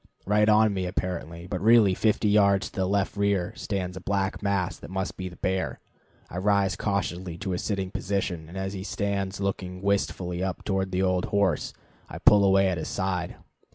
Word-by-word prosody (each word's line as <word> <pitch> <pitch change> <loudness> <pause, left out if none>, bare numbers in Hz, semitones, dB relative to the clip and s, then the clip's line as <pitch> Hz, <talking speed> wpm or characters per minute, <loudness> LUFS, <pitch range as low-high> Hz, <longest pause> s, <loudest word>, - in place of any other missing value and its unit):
right 105 +2 +3
on 110 0 +5
me 95 -2 -2
apparently, 85 -2 -4
but 90 0 -4
really 110 -2 +6
fifty 110 +2 +1
yards 100 -1 +3
to - - -21
the 95 -3 0
left 100 0 0
rear, 100 -3 0
stands 90 -3 -3
a 95 - -7
black 95 0 -1
mass 100 -3 0
that - - -11
must 95 0 -3
be 95 -1 -5
the 85 - -13
bear. 95 0 -2 0.5
I 90 - -5
rise 100 -1 +2
cautiously 95 -4 -2
to 95 +1 -3
a 90 - -2
sitting 95 -3 -2
position, 95 -5 -2
and 90 - -8
as 95 +1 -3
he 95 -1 -5
stands, 100 -1 -2
looking 95 -2 -3
wistfully 95 -3 -1
up 95 -2 -3
toward 95 -1 -1
the 90 +1 +1
old 90 -1 +1
horse, 100 -6 +1 0.4
I - - -7
pull 105 -1 +6
away 95 0 +4
at 90 -2 -1
his - - -4
side. 95 -2 -2
95 Hz, 195 wpm, -26 LUFS, 90-100 Hz, 0.5 s, really